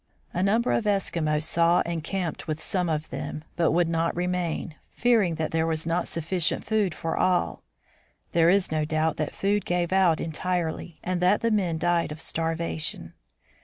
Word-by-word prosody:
A 180 - -1
number 220 +5 +2
of 225 - +1
Eskimos 165 -7 +1
saw 170 +2 +3
and 170 -2 -3
camped 175 -3 -3
with 155 0 -2
some 180 +1 -1
of 155 0 -2
them, 150 - -5
but 170 -2 +2
would 170 +1 +3
not 165 0 0
remain, 175 -2 -2 0.2
fearing 225 -8 +2
that 160 -1 -2
there 160 0 +1
was 160 -1 -1
not 170 +1 0
sufficient 170 +1 -1
food 210 -7 +1
for 165 +1 -3
all. 180 - +1 0.7
There 165 0 +4
is 190 -1 +3
no 155 -1 +1
doubt 155 +1 0
that 155 -1 -3
food 205 +1 +1
gave 175 0 0
out 185 -4 +4
entirely, 165 0 -3
and 180 -1 -1
that 180 +3 +3
the 230 - +1
men 185 -6 +1
died 170 -1 +1
of 150 - -7
starvation. 160 - -2
170 Hz, 175 wpm, -26 LUFS, 160-185 Hz, 0.7 s, There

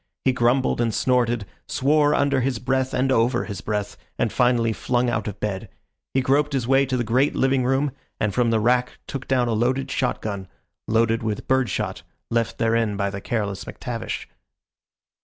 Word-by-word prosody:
He 130 - +4
grumbled 125 +1 +2
and 115 -1 +1
snorted, 120 -2 +1 0.2
swore 150 +2 +3
under 140 -2 +2
his 130 -1 0
breath 130 +2 0
and 130 +1 +1
over 120 0 +2
his 100 -4 -6
breath, 105 0 -3 0.2
and - - 0
finally 120 -2 +3
flung 120 +2 0
out 110 -2 -2
of 105 -1 -5
bed. 100 -3 -3 0.5
He 135 - +4
groped 140 +3 +2
his 130 -4 -1
way 135 +1 +4
to 130 0 0
the 120 - 0
great 125 +5 +2
living 135 -1 +2
room, 135 +3 +1 0.3
and 105 -2 0
from 125 -2 +2
the 115 -1 +2
rack 125 +3 +1
took 135 -1 -6
down 125 -2 +2
a 115 - 0
loaded 130 +4 0
shot 130 -3 0
gun 100 -3 -5 0.4
loaded 115 +1 +2
with 110 -2 -3
bird 130 -2 +2
shot, - - -3 0.3
left 115 -1 0
therein 115 -2 +1
by 100 -1 0
the 100 0 -6
careless 100 -4 -2
McTavish. 120 -3 -5
120 Hz, 185 wpm, -23 LUFS, 115-130 Hz, 0.5 s, He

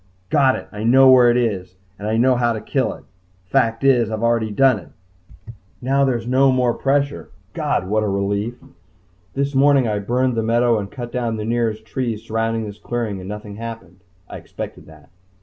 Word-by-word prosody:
Got 140 -4 +4
it! - - -7
I 105 +1 -6
know 130 +3 +6
where 125 -2 +7
it 120 - +3
is! 95 -7 -2 0.2
And 105 - -5
I 110 +1 0
know 125 +2 +4
how 120 -1 +1
to 110 - -4
kill 130 +5 -1
it. - - -16 0.4
Fact 115 +2 0
is, 125 -5 +3
I've 110 0 -4
already 115 -2 +1
done 125 +1 +3
it! 95 +3 -19 0.3
Now 135 +2 +1
there's 120 -4 -1
no 130 +2 +3
more 125 -2 +2
pressure. 140 +2 -1 0.2
God 145 - -1
what 110 +2 +1
a 105 - -1
relief! 100 +4 -1 0.8
This 140 +1 -1
morning 135 -2 +4
I 105 -1 -1
burned 125 +5 0
the 115 - -1
meadow 115 0 +2
and 100 -1 -5
cut 120 +1 -7
down 120 -3 -2
the 105 - -4
nearest 115 -2 -1
trees 115 -2 -3
surrounding 115 0 -2
this 105 -1 -9
clearing 115 -5 -3
and 95 +1 -8
nothing 105 -1 -7
happened. 115 -3 -8 0.3
I - - -8
expected - - -9
that. - - -17
115 Hz, 195 wpm, -20 LUFS, 105-130 Hz, 0.8 s, where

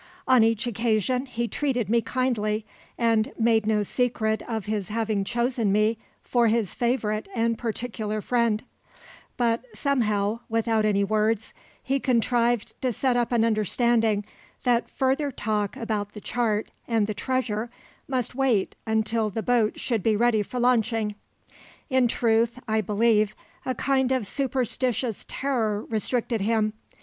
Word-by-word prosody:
On 255 -2 +6
each 225 +1 +2
occasion 240 +3 0
he 235 -1 -2
treated 250 -5 -1
me 230 +3 +3
kindly, 220 -4 -1 0.3
and 225 -2 +2
made 225 -2 +2
no 215 -1 +2
secret 220 -1 0
of 220 -4 -3
his 210 -3 -2
having 215 -2 0
chosen 235 -1 0
me 215 +2 +2 0.2
for 240 -2 +2
his 220 -3 +1
favourite 230 -3 -1
and 230 0 +1
particular 220 -2 -3
friend; 230 -1 +1 0.7
but 235 -1 +1
somehow, 215 -5 +1
without 225 -1 +1
any 200 -1 +2
words, 215 +1 0 0.3
he 275 +1 0
contrived 240 -2 +1
to 255 - +1
set 255 +2 0
up 240 0 +1
an 230 -2 +3
understanding 220 0 +2 0.4
that 240 -2 +2
further 270 +2 0
talk 210 -3 -2
about 210 -3 -3
the 210 - -8
chart 220 -3 -1 0.2
and 225 -3 +2
the 215 - -3
treasure 240 -1 -2 0.4
must 255 -4 -1
wait 250 -7 +1
until 220 0 +1
the 220 +2 -4
boat 235 -3 +1
should 230 -5 -1
be 220 +2 +2
ready 230 0 +3
for 250 +5 -4
launching. 225 -3 +2 0.8
In 260 -2 +4
truth, 230 0 +1
I 220 0 +2
believe, 215 +1 +2 0.3
a 255 - 0
kind 265 0 +1
of 260 -5 +1
superstitious 250 -1 -1
terror 225 -6 -1
restricted 230 0 -1
him. 215 0 +1
225 Hz, 140 wpm, -25 LUFS, 215-245 Hz, 0.8 s, On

